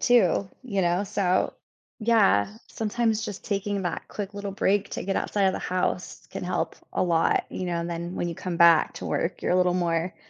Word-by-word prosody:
too, 200 -5 +3
you 205 -7 -1
know, 175 +3 +1
so 190 -2 +1 0.5
Yeah, 105 - +3
sometimes 225 0 0
just 205 - -6
taking 200 -1 -1
that 175 -2 -3
quick 205 -1 -5
little 200 0 -4
break 200 0 +1
to - - -4
get 195 - -1
outside 200 -1 0
of 190 - +4
the - - -3
house 180 0 -2
can - - -6
help 180 0 -2 0.2
a - - +1
lot, 170 -3 +2
you 185 - -4
know, 175 -1 -1
and 170 +1 -4
then 170 +1 -4
when 175 - -2
you 170 - -4
come 175 +1 -4
back 170 -1 +6
to - - -6
work, - - -2
you're - - +1
a - - +4
little 180 -1 +3
more 170 0 0
185 Hz, 210 wpm, -26 LUFS, 175-205 Hz, 0.5 s, back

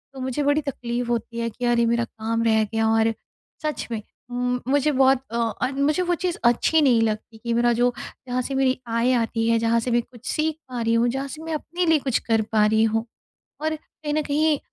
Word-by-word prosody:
तो - - -8
मुझे 260 +3 -1
बड़ी 290 +2 +2
तकलीफ 245 -4 -3
होती 235 0 -2
है 230 0 -1
कि 230 +3 -10
यार 240 0 +3
ये 235 - +4
मेरा 235 0 +2
काम 230 0 -3
रह 220 -1 +3
गया 225 +1 0
और 225 0 +3 0.5
सच 305 -1 -2
में 225 -2 -2 0.3
म 245 0 -1 0.2
मुझे 285 +2 +2
बहुत 265 -1 +4
अ, 235 - -2
और 235 +3 -1
मुझे 285 +5 +1
वो 350 0 +1
चीज़ 355 0 -2
अच्छी 245 +7 +4
नहीं 245 -5 +4
लगती 220 0 -2
कि 235 0 -1
मेरा 240 0 +3
जो 245 +1 +2 0.3
जहाँ 250 0 0
से 270 +2 -4
मेरी 265 -1 +2
आय 230 +2 +1
आती 225 -1 0
है 230 - +4
जहाँ 230 0 +2
से 245 +2 -2
मैं 240 0 +3
कुछ 240 0 -18
सीख 310 0 0
पा 245 -2 -4
रही 230 0 +1
हूँ 235 +1 +3
जहाँ 270 +3 -3
से 305 +3 -8
मैं 325 -1 -4
अपने 345 +4 -2
लिए 320 -2 +4
कुछ 265 -4 0
कर 225 -1 +4
पा 215 -1 +4
रही 220 +1 +3
हूँ। 225 0 +1 0.6
और 315 +1 -1
कहीं 300 -1 -7
न 310 - +1
कहीं 300 +1 +1
245 Hz, 235 wpm, -23 LUFS, 230-285 Hz, 0.6 s, ये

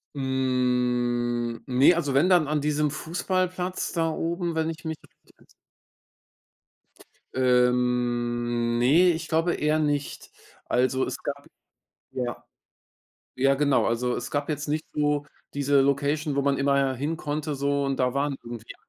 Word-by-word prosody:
Hm, 125 -3 0
ne, 130 +7 +5
also, 150 -5 -1
wenn, 160 +7 +3
dann 175 -5 +4
an 150 -1 0
diesem 150 0 +1
Fußballplatz 180 +3 -2
da 165 -2 0
oben, 170 +1 -2
wenn 160 0 0
ich 160 0 -8
mich 160 0 -2
richtig - - -25
ents - - -23 1.9
Ähm, 120 -1 +1
ne, 165 +9 +5
ich 160 -1 -4
glaube 165 +2 +1
eher 150 +1 +1
nicht. 145 -2 -2 0.3
Also, 130 +1 +1
es - - -4
gab 140 0 -5 0.7
ja. 120 -2 -4 0.9
Ja, 135 +2 +3
genau. 140 -1 +2
Also, 120 +1 0
es 120 - -5
gab 145 +1 -2
jetzt 150 0 -3
nicht 155 +1 -2
so 145 -1 +1 0.3
diese 140 0 +3
Location, 140 +2 0
wo 140 - +2
man 140 -1 +1
immer 140 -1 +2
hin 150 +6 -2
konnte 150 0 -3
so 140 0 0
und 135 -1 -1
da 125 -1 +1
waren 140 0 0
irgendwie 120 -1 -9
140 Hz, 145 wpm, -26 LUFS, 125-155 Hz, 1.9 s, ne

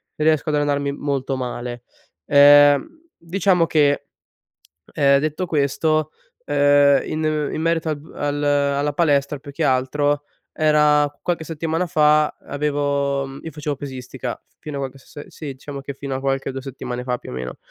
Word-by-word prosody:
riesco 155 0 +1
ad 150 - +1
allenarmi 145 -1 0
molto 140 -2 -2
male. 120 -1 -5 0.4
Ehm, 145 - +5
diciamo 180 0 +1
che, 145 -3 +2 0.9
ehm, 140 -2 +4
detto 155 +5 -2
questo, 155 0 0 0.3
ehm, 145 0 +4
in 155 -1 -1
in - - -3
merito 165 0 0
al 155 - -1
b 150 +3 -15
al 145 0 -2
alla 145 0 +1
palestra, 145 -3 +1
più 145 +1 -11
che 160 +4 -3
altro, 145 +2 +1 0.3
era 150 -1 +3
qualche 175 -2 -1
settimana 165 +2 -2
fa 150 -1 +3
avevo, 140 -1 -1
mhmm, 135 +1 -9
io 160 - -6
facevo 150 -1 -4
pesistica 130 -2 -6 0.2
fino 150 -3 -6
a - - -4
qualche 135 0 -5
se 145 +2 -12
sì 155 - -10
diciamo 140 +1 -8
che 140 +1 -6
fino 135 0 -5
a - - -2
qualche 135 0 -1
2 135 0 -6
settimane 125 -2 -6
fa 125 -1 -2
più - - -11
o - - -7
meno; 65 0 -6
145 Hz, 165 wpm, -21 LUFS, 140-155 Hz, 0.9 s, Ehm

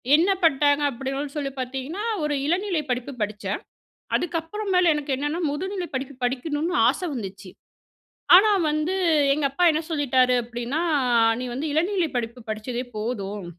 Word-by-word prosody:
என்ன 345 +5 +3
பண்ட்டாங்க 290 -1 +4
அப்டின்னு 270 +3 -4
சொல்லி 275 -2 -2
பார்த்தீங்கன்னா 270 - -4 0.2
ஒரு 300 -1 0
இளநிலை 355 -1 0
படிப்பு 250 +3 -3
படிச்சேன். 205 -1 -3 0.6
அதுக்கப்புற 345 +4 -3
மேல 360 -2 +5
எனக்கு 290 -2 -2
என்னென்னா 295 +5 -2
முதுநிலை 370 +4 -3
படிப்பு 265 +1 -4
படிக்கணும்னு 295 +7 -1
ஆசை 360 - -1
வந்துச்சு. 195 -4 -7 0.9
ஆனா 425 +3 +6 0.2
வந்து 305 +4 -1 0.4
எங்க 300 - -2
அப்பா 350 +6 +1
என்ன 310 - 0
சொல்லிட்டாரு 260 -4 +3
அப்டின்னா 240 +6 -3 0.6
நீ - - -3
வந்து 280 +5 -3
இளநிலை 345 +2 +1
படிப்பு 235 +1 -3
படிச்சதே 235 +3 -3
போதும் 210 -3 -4
285 Hz, 135 wpm, -24 LUFS, 245-325 Hz, 0.9 s, ஆனா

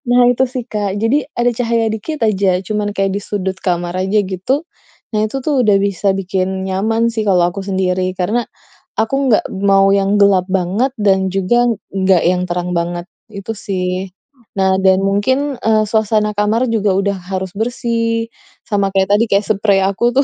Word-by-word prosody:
Nah, 245 0 +4
itu 255 +2 +1
sih, 250 -2 -5
Kak. 205 -2 -2
Jadi, 225 +6 +2 0.2
ada 240 0 +3
cahaya 230 -2 0
dikit 290 +9 -5
aja, 200 -2 +1 0.2
cuman 210 -1 -1
kayak 195 -1 0
di - - -2
sudut 190 -2 -3
kamar 175 -1 -2
aja, 195 +3 +1
gitu. 195 - -2 0.5
Nah, 210 - 0
itu 220 - -6
tuh 280 -5 +2
udah 205 -2 +4
bisa 200 0 0
bikin 190 0 -2
nyaman 220 +5 0
sih 220 -1 -2
kalau 180 -2 +4
aku 195 +3 -6
sendiri. 185 -1 -1
Karena 215 +7 0 0.6
aku 225 +5 0 0.2
nggak 215 - +3 0.2
mau 195 0 +5
yang 200 +1 +1
gelap 195 -2 +4
banget, 195 +8 0
dan 190 -2 +2
juga 240 +6 +2 0.3
enggak 190 -2 +3
yang 180 0 +1
terang 180 0 -3
banget. 175 +1 -3 0.3
Itu, 200 +1 -6
sih. 185 -2 -3 0.5
Nah, 190 0 +3
dan 190 0 +4
mungkin, 260 +9 0
eee, 220 -1 +3
suasana 215 -1 +1
kamar 220 +4 +1
juga 210 -3 +1
udah 200 0 0
harus 190 -1 -3
bersih, 230 0 -1 0.4
sama 200 -2 +1
kayak 190 0 +1
tadi 230 - +2
kayak 200 +1 +2
sprei 200 -2 +2
aku 200 +5 +1
tuh 275 - +4
200 Hz, 175 wpm, -16 LUFS, 190-225 Hz, 0.6 s, mau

